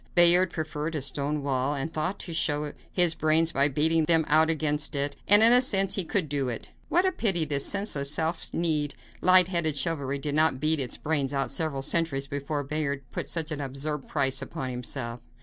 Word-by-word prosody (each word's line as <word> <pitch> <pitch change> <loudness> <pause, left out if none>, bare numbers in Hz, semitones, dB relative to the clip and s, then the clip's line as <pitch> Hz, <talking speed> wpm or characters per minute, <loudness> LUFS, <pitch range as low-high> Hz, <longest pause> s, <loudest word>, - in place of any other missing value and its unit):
Bayard 175 +1 +6
preferred 155 -1 -5
a 150 - -2
stone 145 +1 -2
wall, 135 +1 -1
and 145 +4 -5
thought 180 +5 -2
to 170 - -6
show 150 -2 0 0.2
his 175 -3 +3
brains 160 +1 +1
by 140 -2 +2
beating 155 +3 +1
them 165 -1 +2
out 160 +2 +3
against 155 -1 0
it, 140 0 -1
and 205 +2 +8
in 230 +2 +9
a 250 - +10
sense 195 -6 +2
he 195 - 0
could 170 0 -1
do 140 -3 -2
it. 115 - -6 0.2
What 355 +2 +2
a 375 - +2
pity 190 - 0
this 140 -2 -1
senseless, 175 -9 0
stiff 160 +2 -1
kneed, 155 -4 -1 0.3
light 185 0 +5
headed 170 -5 0
chivalry 140 -2 -2
did 145 +1 -4
not 155 -3 +2
beat 155 +2 +1
its 130 -3 -3
brains 145 -3 -2
out 135 -1 -1
several 140 -2 -2
centuries 145 -2 -1
before 145 +1 -4
Bayard 140 -1 -3
put - - -5
such 165 -1 -2
an 150 -1 -4
absurd 140 +2 -5
price 135 -3 -1
upon 130 -1 -6
himself. 125 -1 -5
155 Hz, 200 wpm, -26 LUFS, 140-165 Hz, 0.3 s, a